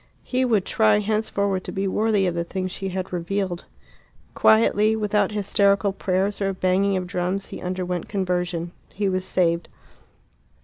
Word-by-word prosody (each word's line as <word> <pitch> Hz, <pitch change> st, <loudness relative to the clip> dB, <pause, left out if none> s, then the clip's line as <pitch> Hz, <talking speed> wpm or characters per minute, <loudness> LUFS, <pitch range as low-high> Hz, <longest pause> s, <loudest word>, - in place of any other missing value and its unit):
He 255 Hz, 0 st, 0 dB
would 220 Hz, -6 st, +2 dB
try 110 Hz, -, +3 dB
henceforward 200 Hz, -2 st, -1 dB
to -, -, -5 dB
be 195 Hz, 0 st, -2 dB
worthy 210 Hz, 0 st, +1 dB
of 180 Hz, -, 0 dB
the 170 Hz, 0 st, -1 dB
things 185 Hz, +1 st, -4 dB
she 195 Hz, +1 st, -4 dB
had 185 Hz, 0 st, -4 dB
revealed. 180 Hz, 0 st, -2 dB, 0.7 s
Quietly, 220 Hz, 0 st, +4 dB
without 210 Hz, 0 st, +1 dB
hysterical 200 Hz, -1 st, +2 dB
prayers 195 Hz, +2 st, -1 dB
or 195 Hz, 0 st, 0 dB
banging 190 Hz, +1 st, +1 dB
of 185 Hz, -, -3 dB
drums, 180 Hz, +2 st, -2 dB
he -, -, -8 dB
underwent 180 Hz, -1 st, -3 dB
conversion. 180 Hz, -3 st, -2 dB, 0.2 s
He 205 Hz, 0 st, -2 dB
was 185 Hz, -1 st, 0 dB
saved. 170 Hz, -2 st, 0 dB
190 Hz, 150 wpm, -23 LUFS, 180-205 Hz, 0.7 s, Quietly